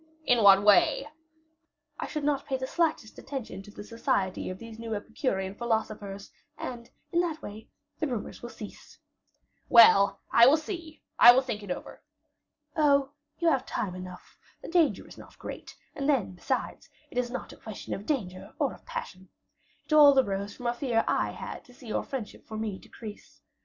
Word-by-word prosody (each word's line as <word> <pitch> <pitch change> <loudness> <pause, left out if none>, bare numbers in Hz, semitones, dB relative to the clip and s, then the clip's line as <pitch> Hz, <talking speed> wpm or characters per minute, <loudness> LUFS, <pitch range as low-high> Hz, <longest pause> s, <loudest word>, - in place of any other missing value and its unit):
"In 245 -2 +4
what 200 -1 +7
way?" 210 +7 +5 0.9
"I - - -3
should 300 -2 -4
not 285 -1 0
pay 265 - 0
the 260 - -3
slightest 315 -6 -1
attention 265 -8 -6
to 195 - -14
the 205 - -9
society 200 -4 -1
of 185 - -5
these 225 +1 -11
new 225 -1 -4
Epicurean 205 -3 -2
philosophers; 215 -3 -3 0.3
and, 235 -2 -7 0.2
in 345 - +2
that 325 -3 -3
way, 215 +2 -9 0.3
the 310 - 0
rumors 240 -6 -5
will 240 - -7
cease." 210 -3 -11 0.7
"Well, 200 -4 +7
I 235 +1 +8
will 290 +4 +6
see; 320 0 -7 0.2
I 240 - +11
will 260 +2 +3
think 235 -5 -4
it 205 - -10
over." 180 - -6 0.7
"Oh, 280 -3 +3 0.3
you 340 - 0
have 270 -4 +1
time 200 -6 -3
enough; 185 -1 -10 0.2
the - - -7
danger 335 -2 +2
is - - -13
not - - -14
great; - - -9 0.2
and 275 +1 -2
then, 255 -10 +2
besides, 180 - -3 0.2
it - - -8
is 245 -1 -1
not 255 - -6
a - - -15
question 220 -3 -7
of 200 - -6
danger 185 -11 -3
or - - 0
of - - -17
passion. 190 - -7 0.6
It - - -3
all 290 -2 +8
arose 200 -4 0
from 245 - -10
a 240 - +1
fear 240 -3 0
I - - +1
had - - -7
to 250 - -18
see 245 - -12
your - - 0
friendship 250 -6 -7
for 220 - -6
me 215 -3 -3
decrease. 215 -3 -12
230 Hz, 185 wpm, -28 LUFS, 205-275 Hz, 0.9 s, I